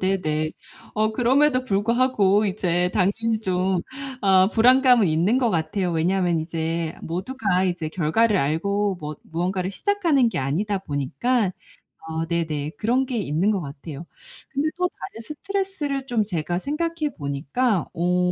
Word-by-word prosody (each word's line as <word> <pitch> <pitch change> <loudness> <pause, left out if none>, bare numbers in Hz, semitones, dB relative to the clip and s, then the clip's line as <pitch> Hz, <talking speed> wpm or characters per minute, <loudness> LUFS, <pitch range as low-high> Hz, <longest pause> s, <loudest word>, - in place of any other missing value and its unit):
네네. 155 -5 0 0.4
어 215 0 +1
그럼에도 255 +3 +3
불구하고 210 -2 +2
이제 180 -2 0
당연히 220 +3 +1
좀 185 -2 0 0.4
어 190 -1 +5
불안감은 250 -1 +5
있는 170 +10 +2
것 245 -3 +2
같아요. 175 +2 -1
왜냐하면 175 +1 +1
이제 165 0 -2
모두가 190 +1 -1
이제 175 -4 -1
결과를 190 +7 +2
알고 195 +7 0
뭐 150 0 -5
무언가를 180 +3 -2
시작하는 330 - +2
게 - - -3
아니다 190 +10 -1
보니까. 185 - -1 0.6
어 160 0 -3
네네. 155 -3 -2
그런 250 +4 +1
게 250 -2 -2
있는 180 +1 0
것 200 -4 +1
같아요. 145 +2 -8 0.4
근데 290 +2 0
또 360 0 +2
다른 220 - -9
스트레스를 305 - -3
좀 235 -4 +1
제가 175 -2 -2
생각해 310 - -2
보니까 155 - -1
어 180 +1 +1
190 Hz, 300 characters per minute, -23 LUFS, 165-240 Hz, 0.6 s, 어